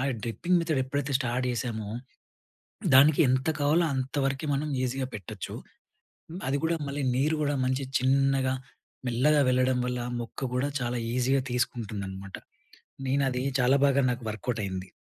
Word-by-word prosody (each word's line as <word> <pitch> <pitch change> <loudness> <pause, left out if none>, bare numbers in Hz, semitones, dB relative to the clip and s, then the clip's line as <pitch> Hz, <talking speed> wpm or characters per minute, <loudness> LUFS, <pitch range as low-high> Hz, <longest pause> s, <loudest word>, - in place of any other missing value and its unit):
ఆ - - 0 0.2
dripping 170 - 0
method 160 -5 0
ఎప్పుడైతే 140 +1 -2
start 125 0 -1
జేసామో, 115 -3 -3 1.1
దానికి 140 +4 +7
ఎంత 130 +3 +1
కావాలో 150 +4 +3
అంతవరకే 135 +2 -1
మనం 145 +2 -1 0.2
ఈజీగా 130 +1 -2
పెట్టొచ్చు. 100 -5 -6 0.7
హ్మ్ 170 +3 -7
అది 135 - +1
కూడా, 165 +1 +2
మళ్ళీ 140 +1 -3
నీరు 150 +5 +2
గూడా 145 -1 +1
మంచి 130 +1 0
చిన్నగా 135 0 +2 0.5
మెల్లగా 140 +5 +3
వెళ్ళడం 130 0 +2
వల్ల 125 0 -2 0.2
మొక్క 120 +3 -4
కూడా 135 +3 0
చాలా 120 0 -1 0.2
ఈజీగా 130 +2 +2
తీసుకుంటుందనమాట. 100 -6 -3 0.7
నేను 140 +1 +2
అది 125 0 -2 0.2
చాలా 130 +3 +4
బాగా 140 0 +3
నాకు 120 -1 -4
వర్కౌటైంది. 100 -4 -3
130 Hz, 140 wpm, -28 LUFS, 120-140 Hz, 1.1 s, దానికి